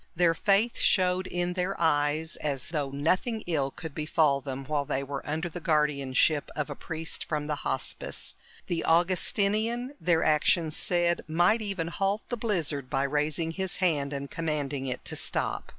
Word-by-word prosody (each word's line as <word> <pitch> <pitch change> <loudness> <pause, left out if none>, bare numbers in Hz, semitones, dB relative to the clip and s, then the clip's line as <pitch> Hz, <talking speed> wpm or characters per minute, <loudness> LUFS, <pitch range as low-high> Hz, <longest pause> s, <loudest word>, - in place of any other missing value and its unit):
Their 170 0 +4
faith 205 +6 +2
showed 185 -1 +3
in 175 0 -1
their 185 +2 -2
eyes, 155 0 +2
as 140 -4 -3
though 150 -4 -1
nothing 185 - 0
ill 145 -6 0
could 160 +2 -8
befall 150 -2 +2
them 135 0 -5
while 145 0 0
they 135 0 -2
were 140 0 -5
under 160 +3 -1
the 175 +1 -6
guardianship 150 -2 +2
of 150 -1 -2
a - - -4
priest 160 +1 -5
from 150 -2 -2
the 150 -1 -2
Hospice. 135 - -3 0.3
The 170 -2 -2
Augustinian, 210 - +1
their 170 -2 +3
actions 155 +1 +3
said, 175 -1 +1
might 175 +8 +3
even 195 -6 -2
halt 195 +4 0
the 245 - -1
blizzard 160 - -1
by 135 +1 +1
raising 150 +3 0
his 190 +2 -2
hand 150 -7 +1
and 140 -1 -4
commanding 145 -4 -2
it 125 - -4
to - - -4
stop. - - -2
160 Hz, 165 wpm, -28 LUFS, 145-180 Hz, 0.3 s, Their